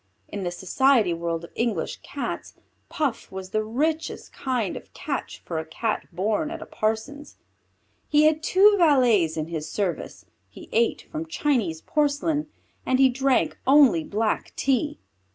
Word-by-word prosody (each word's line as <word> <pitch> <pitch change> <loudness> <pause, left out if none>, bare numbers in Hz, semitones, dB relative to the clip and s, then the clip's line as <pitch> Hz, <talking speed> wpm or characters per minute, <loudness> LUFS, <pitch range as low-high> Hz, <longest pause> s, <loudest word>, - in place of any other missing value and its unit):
In 200 - -6
the 180 - -1
society 205 +3 +2
world 170 0 -3
of 170 - -10
English 235 -2 -1
Cats, - - -6 0.3
Puff 285 -7 -2
was 190 0 -7
the 215 0 0
richest 300 +9 -2
kind 245 -7 -2
of - - -10
catch - - -5
for 165 -2 -3
a - - -3
Cat 215 +7 -2
born 210 - 0
at 330 0 -6
a - - -8
parson's. 225 +7 -3 0.7
He 300 0 +5
had 310 0 +4
two 390 +5 +5
valets 240 - +4
in 155 +1 -3
his 155 -2 -4
service; 195 -2 -3 0.2
he - - -13
ate 470 -1 +1
from 325 +1 -4
Chinese 245 - 0
porcelain, 295 +1 0 0.4
and 260 - +1
he 265 0 +6
drank 265 +1 +1
only 265 - +6
black 215 +5 -1
tea. 275 +3 0
245 Hz, 150 wpm, -25 LUFS, 190-295 Hz, 0.7 s, he